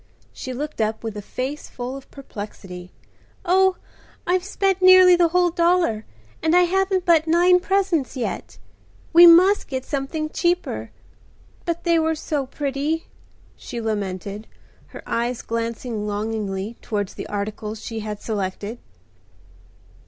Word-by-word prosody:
She 260 - -6
looked 285 0 -4
up 220 +1 -1
with 220 -2 -4
a 210 - -5
face 260 +8 -5
full 250 +1 -6
of 275 - -11
perplexity. 195 -8 -9 0.5
"Oh! 380 +1 +4 0.5
I've 360 0 +1
spent 390 -1 0
nearly 370 -1 +8
the 345 -1 +4
whole 355 +1 +2
dollar 340 -10 +1 0.3
and 320 +2 +2
I 360 - +7
haven't 380 +1 +1
but 330 -3 +4
nine 350 +2 +5
presents 370 -8 0
yet. 245 - -4 0.6
We 345 +1 +10
must 365 +5 +6
get 260 -1 -4
something 305 +2 -3
cheaper.—But 345 -1 -4
they 335 -1 +3
were 320 0 +1
so 295 -3 -3
pretty!" 285 +4 -2 0.5
she 240 - -7
lamented, 205 -1 -4 0.4
her - - -11
eyes 235 +1 -2
glancing 230 -1 -3
longingly 210 0 -3
towards 205 -3 -3
the - - -7
articles 210 +1 -4
she 225 -1 -4
had 210 -1 -5
selected. 205 +2 -4
275 Hz, 130 wpm, -22 LUFS, 220-345 Hz, 0.6 s, We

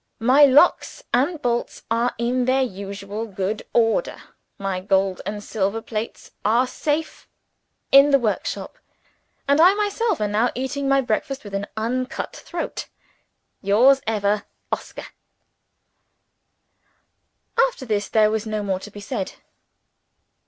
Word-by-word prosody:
My 260 +6 +6
locks 285 +6 +3
and 290 +7 +2
bolts 240 -1 -2
are 235 +2 +1
in 245 +2 0
their 260 +1 +3
usual 200 0 -5
good 195 +1 -3
order; 230 - +1 0.4
my 195 -2 -2
gold 190 0 +1
and 205 0 -4
silver 205 +1 -1
plates 225 0 -6
are 235 +4 +3
safe 295 +4 -3 0.6
in 275 +1 +8
the 280 - +6
workshop: 230 -5 -3 0.7
and 285 +3 +4
I 370 +4 +7
myself 420 -1 0
am 210 -1 -1
now 220 +4 +2
eating 270 +2 -2
my 275 0 +4
breakfast 270 +4 -2
with 205 -2 -10
an 200 +1 -2
uncut 250 +3 -3
throat 345 -1 -5 0.7
Yours 250 +8 +5
ever, 210 -1 0 0.3
"OSCAR." - - -5 2.6
After 385 - -9
this, 210 -3 -1
there 215 -1 +4
was 220 0 -2
no 215 -1 -2
more 190 -2 -1
to 210 - -10
be 205 0 -11
said. 195 -1 -4
230 Hz, 130 wpm, -22 LUFS, 205-270 Hz, 2.6 s, in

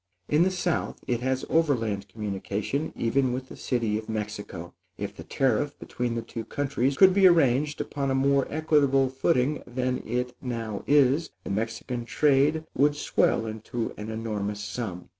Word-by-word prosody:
In 150 +2 +3
the 180 - +5
south 180 -2 -1
it 120 -2 0
has 130 +1 -1
overland 115 -11 +1
communication 105 +7 -3
even 125 +2 +1
with 130 +1 -5
the - - -9
city 115 -4 -1
of 110 - -11
Mexico. 105 -5 -5 0.2
If - - -5
the - - -9
tariff 135 +2 0
between 120 -1 -3
the 115 - -2
two 115 0 -6
countries 135 +1 -1
could 190 -1 +7
be 195 0 +7
arranged 150 -3 +3
upon 140 -1 -2
a 130 - +1
more 140 0 +3
equitable 145 -4 +3
footing 135 +1 +1
than 125 +1 -1
it 125 +2 -2
now 115 -5 -4
is, 145 +2 +4
the - - -5
Mexican 115 +3 -3
trade 150 +4 +2
would 145 +2 +3
swell 115 -5 +1
into 110 +1 -4
an 105 +1 -7
enormous 105 -2 -3
sum. 105 -5 -5
125 Hz, 160 wpm, -27 LUFS, 110-145 Hz, 0.2 s, could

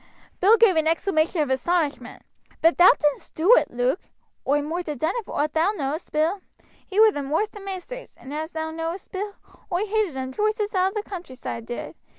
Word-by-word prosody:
Bill 420 +5 +6
gave 420 -7 +5
an 315 0 +2
exclamation 325 0 +1
of 275 - -3
astonishment: 300 +2 -1 0.4
"But 330 +2 +3
thou 355 - +9
didn'st 295 -2 +1
do 355 +9 +5
it, - - +2
Luke?" 245 +6 0 0.5
"I 290 - +4
moight 330 +4 -4
ha' 300 -2 -3
done 315 +8 0
it 465 - -4
for - - -5
owt 300 +1 0
thou 335 +6 +2
know'st, 300 -2 -4
Bill. 325 +6 +1 0.5
He 400 +1 -1
wer 440 0 +8
the 290 - -4
worst 320 +11 -1
of 410 - -8
maisters, 390 +6 -8
and, 270 - -9
as 315 +2 -4
thou 320 0 -3
know'st, 330 +3 -5
Bill, 400 +1 -4 0.4
oi 365 +4 +1
hated 425 -7 0
him 260 0 -4
joost 430 - 0
as 420 0 -2
all 375 0 +2
the 420 +1 -3
countryside 260 - -7
did. 240 - -5
335 Hz, 205 wpm, -24 LUFS, 300-400 Hz, 0.5 s, thou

